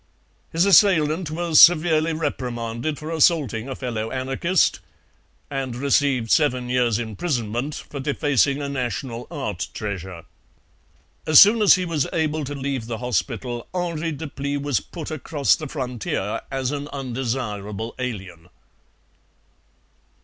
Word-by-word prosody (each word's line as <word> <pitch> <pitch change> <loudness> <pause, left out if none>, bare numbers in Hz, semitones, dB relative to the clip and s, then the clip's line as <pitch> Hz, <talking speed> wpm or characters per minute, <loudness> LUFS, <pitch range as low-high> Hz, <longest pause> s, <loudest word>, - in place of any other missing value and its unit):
His 165 +3 +2
assailant 170 -4 +4
was 165 0 +2
severely 160 -1 +6
reprimanded 125 -3 -3
for 155 +3 -7
assaulting 145 - +2
a 135 - -4
fellow 115 -4 -4
anarchist 135 +8 +1 0.7
and 135 -3 -4
received 135 -3 +1
seven 125 -5 +2
years' 125 -3 +2
imprisonment 120 - -3
for 140 - -8
defacing 140 0 +1
a - - -2
national 125 -2 -4
art 130 - -4
treasure. 95 -5 -5 1.0
As 155 -2 +8
soon 215 +3 +7
as 205 - +7
he 185 -1 -2
was 160 -5 -1
able 155 -1 0
to 145 +2 -5
leave 135 -4 -3
the 115 -1 -4
hospital 120 +1 -3
Henri 170 -2 -2
Deplis 140 -1 -4
was 140 -2 0
put 165 -3 -8
across 150 -1 +1
the 155 - -7
frontier 125 -7 -3
as 135 -1 -2
an 145 0 -4
undesirable 115 -6 -4
alien. 95 -9 -6
135 Hz, 125 wpm, -23 LUFS, 120-155 Hz, 1.0 s, As